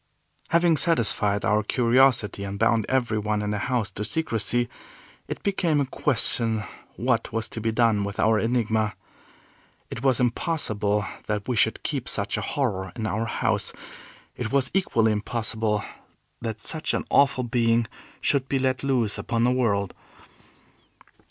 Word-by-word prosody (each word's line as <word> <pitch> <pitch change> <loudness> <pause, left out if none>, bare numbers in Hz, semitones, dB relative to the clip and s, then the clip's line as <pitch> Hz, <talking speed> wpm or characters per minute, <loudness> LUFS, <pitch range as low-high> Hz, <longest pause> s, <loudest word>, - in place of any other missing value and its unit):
Having 170 -1 +3
satisfied 105 - +1
our 105 0 +3
curiosity, 120 -2 +3
and 100 0 -5
bound 115 0 +2
every 120 -4 +1
one 105 0 -1
in 105 - -2
the 105 - -1
house 120 -4 -1
to 100 - -5
secrecy, 120 -2 0 0.6
it - - -6
became 175 -6 +1
a 140 - +2
question 115 -5 +1 0.3
what 120 -2 0
was 115 0 -1
to 110 - -5
be 115 +1 0
done 110 -3 +2
with 100 +1 -5
our 110 -1 +4
Enigma? 110 -2 0 1.0
It - - -5
was 130 -3 +2
impossible 110 -6 0 0.2
that 105 -1 -2
we 125 - 0
should - - +1
keep - - -2
such - - -1
a - - -2
horror 100 -9 -2
in 115 -3 -4
our 110 +1 -1
house; 115 - -1 0.6
it 115 -3 -4
was 135 -2 +1
equally 115 - +2
impossible 110 -1 -1 0.6
that 110 -2 -4
such 155 +9 -2
an - - -2
awful 135 -2 +4
being 115 -1 +2 0.4
should 135 -2 +1
be 135 - +1
let 130 -1 0
loose 125 -6 0
upon 115 -2 -1
the 125 - +4
world. 105 -6 0
115 Hz, 150 wpm, -25 LUFS, 105-130 Hz, 1.0 s, our